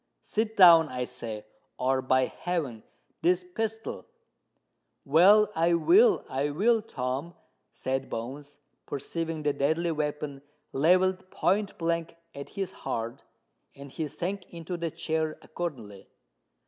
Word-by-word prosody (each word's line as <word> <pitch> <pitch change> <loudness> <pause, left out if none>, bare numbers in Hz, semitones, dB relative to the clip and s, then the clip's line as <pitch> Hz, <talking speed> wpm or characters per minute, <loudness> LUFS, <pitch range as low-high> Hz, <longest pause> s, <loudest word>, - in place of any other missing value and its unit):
"Sit 220 0 -1
down, 165 -5 +8
I 125 -1 -3
say—or, 115 +4 -4
by 130 0 +3
heaven! 150 -12 -3 0.4
this 180 +1 +2
pistol——" 220 +4 -4 1.0
"Well—I 175 +2 +5
will—I 335 - +3
will, 220 +10 +2
Tom," 135 - -4 0.4
said 135 0 -3
Bones, 140 +5 -6 0.3
perceiving 160 +3 -4
the 145 -1 +1
deadly 160 +5 +1
weapon 150 -2 -3 0.3
levelled 185 +5 +3
point 205 +2 0
blank 165 -1 -1 0.2
at 140 0 -8
his 195 -2 -2
heart: 120 0 -4 0.5
and 140 -1 -11
he 155 +2 -3
sank 185 +6 -5
into 170 +1 -6
the 170 -1 -2
chair 160 0 -2
accordingly. 120 - -6
160 Hz, 110 wpm, -28 LUFS, 135-180 Hz, 1.0 s, down